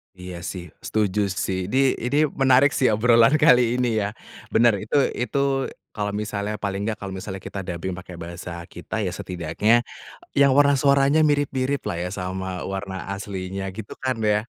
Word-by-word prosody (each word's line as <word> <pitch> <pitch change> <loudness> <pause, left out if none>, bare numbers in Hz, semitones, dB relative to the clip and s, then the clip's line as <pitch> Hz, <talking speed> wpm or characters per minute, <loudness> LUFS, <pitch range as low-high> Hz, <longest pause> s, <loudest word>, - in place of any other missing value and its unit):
Iya, 90 -1 -8 0.2
sih, 90 -2 -6 0.2
setuju 105 -2 0 0.2
sih. 95 -1 -2
Ini, 130 - -1 0.3
ini 140 +4 +1 0.2
menarik 135 +2 +5
sih, 130 - +3
obrolan 115 +4 +5
kali 125 -4 +5
ini 125 -1 +1
ya. 100 - 0 0.5
Bener, 115 -1 +5
itu - - -3 0.3
itu 140 +3 -1 0.5
kalau 105 -1 -2
misalnya 105 0 -3
paling 100 -1 -2
enggak, 110 -1 -2
kalau 100 -1 -5
misalnya 95 -1 -6
kita 100 - -6
dubbing 90 +1 -4
pakai 90 -1 -9
bahasa 85 +1 -7 0.2
kita 90 +5 -6
ya, 90 - -1
setidaknya 95 +5 +1 0.5
yang 140 -1 +5
warna 145 0 +6
suaranya 140 +2 +4
mirip-miriplah 140 -7 0
ya, 90 - -2
sama 95 0 -4
warna 95 -1 -4 0.2
aslinya, 95 -1 -5
gitu 110 -2 -7
kan, 130 -2 0
ya. 105 0 +3
105 Hz, 160 wpm, -23 LUFS, 95-125 Hz, 0.5 s, warna